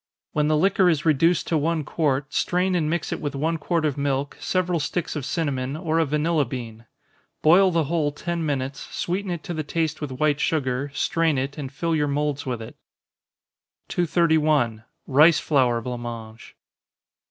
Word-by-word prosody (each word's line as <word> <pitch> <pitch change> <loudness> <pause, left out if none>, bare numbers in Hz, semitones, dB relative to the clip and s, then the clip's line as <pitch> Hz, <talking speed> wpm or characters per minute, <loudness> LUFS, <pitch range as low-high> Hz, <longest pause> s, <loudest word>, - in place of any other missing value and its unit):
When 150 0 +1
the 155 0 +3
liquor 190 +2 +3
is 160 -2 0
reduced 165 +3 +3
to 160 - +1
one 160 +1 0
quart, 140 -2 -1
strain 180 +1 +1
and 160 -4 +1
mix 170 0 -2
it - - -5
with 145 -2 -3
one 160 +4 -1
quart 165 +2 0
of 145 -2 -1
milk, 140 0 -1
several 180 -2 0
sticks 165 +3 -2
of 145 -4 -3
cinnamon, 140 -4 -2
or 160 -1 0
a 165 - +3
vanilla 150 +2 +1
bean. 115 -3 -7 0.6
Boil 185 +5 +6
the 165 -2 +1
whole 150 0 0
ten 170 +3 -3
minutes, 135 -2 -2
sweeten 190 +3 -3
it 170 -3 -4
to 175 - -5
the 155 - -2
taste 160 +1 -2
with 150 - -3
white 145 +2 +1
sugar, 140 -3 0
strain 165 -1 +1
it, 135 +2 -2
and 140 -4 -6
fill 165 +3 -1
your 150 -1 +1
moulds 145 0 -1
with 120 -3 -3
it. 110 - -11 1.1
231. 155 -9 +2 0.2
_Rice 150 +4 +6
Flour 125 -5 +2
Blanc 125 0 -5
Mange. 115 -1 -8
150 Hz, 175 wpm, -24 LUFS, 135-165 Hz, 1.1 s, Boil